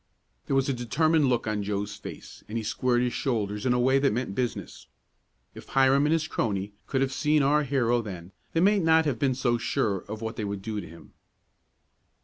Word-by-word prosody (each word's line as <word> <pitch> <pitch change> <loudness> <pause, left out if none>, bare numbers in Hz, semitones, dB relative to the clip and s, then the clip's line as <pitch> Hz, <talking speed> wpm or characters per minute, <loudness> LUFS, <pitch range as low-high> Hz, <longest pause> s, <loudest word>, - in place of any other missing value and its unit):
There 135 - 0
was 135 0 +2
a 140 - +1
determined 155 +6 +2
look 125 -3 +1
on 105 -1 -1
Joe's 100 0 -3
face, 105 - -10
and 110 - -3
he 115 - -2
squared 120 +3 +1
his 125 - -1
shoulders 105 -3 -1
in 125 - +3
a 125 - +1
way 130 +2 +3
that 135 0 +2
meant 115 -2 -2
business. 120 +3 -4 0.7
If - - -12
Hiram 135 +2 +4
and 155 - +2
his 160 -1 0
crony 100 -7 -2
could 135 -2 0
have 135 0 0
seen 150 +1 +2
our 150 +2 +3
hero 120 -4 +1
then 95 -5 -8 0.2
they 165 - +2
might 200 +2 +4
not 160 -1 +4
have 135 -6 -1
been 135 -2 +1
so 120 -2 +1
sure 110 -5 0
of 110 +1 -6
what 110 0 -4
they 110 - -3
would 100 -1 -4
do 105 -1 -3
to 85 - -10
him. 85 +1 -15
125 Hz, 215 wpm, -27 LUFS, 105-140 Hz, 0.7 s, Hiram